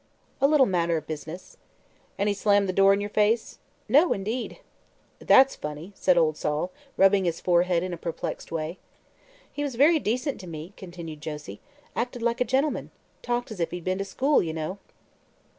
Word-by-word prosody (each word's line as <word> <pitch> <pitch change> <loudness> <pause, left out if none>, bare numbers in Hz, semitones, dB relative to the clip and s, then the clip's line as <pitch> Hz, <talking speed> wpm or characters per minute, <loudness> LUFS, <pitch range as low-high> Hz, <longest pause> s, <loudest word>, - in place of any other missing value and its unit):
"A 275 - +6
little 290 -2 +5
matter 170 -5 +1
of 155 - -6
business." 155 +3 -8 0.6
"An' 200 - 0
he 205 - +2
slammed 205 0 +2
the 185 - -1
door 195 +1 +5
in 200 +1 +2
yer 205 - -2
face?" 215 +2 +1 0.3
"No, 310 +6 +5
indeed." 220 +6 -4 0.6
"That's 270 +1 +5
funny," 150 +5 -7
said 185 -2 +2
old 155 -2 +3
Sol, 150 +4 -2 0.3
rubbing 195 0 +5
his 170 -1 -1
forehead 175 -1 +2
in 185 -1 -3
a - - -4
perplexed 165 0 -5
way. 165 +2 -4 0.7
"He 290 - -4
was 285 -4 -2
very 305 +6 +5
decent 255 +4 -2
to 185 - -10
me," 165 +3 -8
continued 170 -4 -9
Josie. 150 -10 -7 0.3
"Acted 245 0 -3
like 235 +1 0
a - - +4
gentleman. 270 +4 0 0.3
Talked 240 -1 -2
as 210 - -7
if 170 - 0
he'd 175 -1 -6
been 185 +2 -1
to - - 0
school, 265 +9 +2
you 160 -2 -3
know." 160 +5 -4
190 Hz, 185 wpm, -26 LUFS, 165-235 Hz, 0.7 s, A